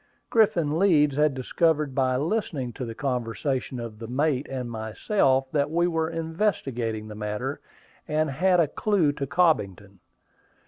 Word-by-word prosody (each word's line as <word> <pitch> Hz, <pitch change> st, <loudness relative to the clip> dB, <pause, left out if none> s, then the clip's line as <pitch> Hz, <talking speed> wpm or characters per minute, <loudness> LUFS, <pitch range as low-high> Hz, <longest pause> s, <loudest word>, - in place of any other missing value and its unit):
Griffin 170 Hz, -9 st, +3 dB
Leeds 150 Hz, -8 st, +4 dB
had 150 Hz, -1 st, +2 dB
discovered 150 Hz, +2 st, +1 dB
by 130 Hz, -1 st, +1 dB
listening 145 Hz, -, -2 dB
to 125 Hz, -, -5 dB
the 115 Hz, -1 st, -7 dB
conversation 125 Hz, 0 st, -2 dB
of 115 Hz, -2 st, -7 dB
the 115 Hz, -, -7 dB
mate 140 Hz, +2 st, 0 dB
and 125 Hz, -3 st, -4 dB
myself, 130 Hz, -, +1 dB
that 145 Hz, -1 st, +1 dB
we 170 Hz, +2 st, +2 dB
were 160 Hz, -2 st, 0 dB
investigating 160 Hz, -, -2 dB
the 105 Hz, -, -8 dB
matter, 105 Hz, 0 st, -4 dB, 0.5 s
and 155 Hz, -1 st, 0 dB
had 180 Hz, +6 st, +3 dB
a 165 Hz, -, +4 dB
clue 180 Hz, -1 st, +1 dB
to 140 Hz, -1 st, -4 dB
Cobbington. 100 Hz, -, 0 dB
140 Hz, 145 wpm, -26 LUFS, 120-165 Hz, 0.5 s, Leeds